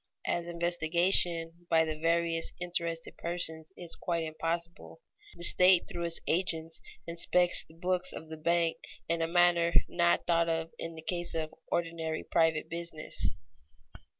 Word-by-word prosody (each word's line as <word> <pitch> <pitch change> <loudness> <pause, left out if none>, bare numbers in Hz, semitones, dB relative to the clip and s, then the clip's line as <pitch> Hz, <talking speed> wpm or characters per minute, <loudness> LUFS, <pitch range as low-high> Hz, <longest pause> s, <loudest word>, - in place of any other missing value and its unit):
As 170 0 -1
investigation 170 0 0
by 160 0 +4
the 155 -1 -3
various 165 +1 0
interested 170 -2 -3
persons 160 -2 -1
is 175 -2 -4
quite 170 -2 -2
impossible, 165 - -4 0.4
the 170 - -8
state 180 0 +6
through 170 -1 -4
its 170 -1 0
agents 165 -2 +1 0.2
inspects 175 +1 +2
the 160 - -20
books 180 +1 +1
of 160 - -8
the 160 - -7
bank 170 +1 +1 0.3
in 165 0 0
a 165 - +1
manner 170 0 +3
not 175 0 +2
thought 170 -1 +2
of 165 0 -1
in 165 0 -5
the 160 - -10
case 175 0 -2
of 155 -1 -3 0.2
ordinary 165 -2 -2
private 160 -2 +1
business. 170 -2 -2
170 Hz, 145 wpm, -31 LUFS, 165-175 Hz, 0.4 s, state